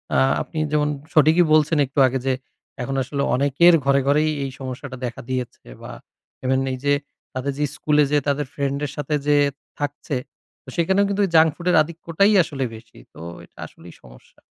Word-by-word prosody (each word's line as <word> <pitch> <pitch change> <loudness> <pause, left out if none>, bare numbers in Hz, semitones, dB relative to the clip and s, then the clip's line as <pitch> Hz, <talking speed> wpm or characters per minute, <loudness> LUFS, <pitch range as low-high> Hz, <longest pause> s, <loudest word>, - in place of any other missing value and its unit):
আ - - +4 0.2
আপনি - - -8
যেমন 150 -1 +1 0.2
সঠিকই 160 +3 +5
বলছেন 155 +1 +3
একটু 140 - -3
আগে। 130 +1 -2
যে 130 - +3 0.5
এখন 135 +2 -3
আসলে 140 +2 -3
অনেকের 145 +6 +4
ঘরে, 140 0 +4
ঘরেই 150 +2 +3
এই 135 - -4
সমস্যাটা 130 0 -7
দেখা 120 - -6
দিয়েছে 125 -2 -5
বা - - -8 0.5
ইভেন 130 +1 +2
এইযে 145 +3 0 0.4
তাদের 130 +2 -3
যে 150 - +1
স্কুলে 150 -1 +2
যে 150 - +4
তাদের 145 +1 0
ফ্রেন্ডের 140 0 -2
সাথে 150 +1 -1
যেয়ে 145 -1 +4 0.3
থাকছে, 145 0 -4 0.5
তো - - -12
সেখানেও 190 +4 +2
কিন্তু 200 +1 0
এই - - -10
জাঙ্ক 160 0 +6
ফুডের 180 +1 0
আধিক্যটাই 170 +5 0
আসলে 145 -5 -4
বেশি। 115 0 -16 0.2
তো - - -14 0.3
এটা - - -34
আসলেই - - -15
সমস্যা। - - -18
145 Hz, 175 wpm, -22 LUFS, 135-155 Hz, 0.5 s, জাঙ্ক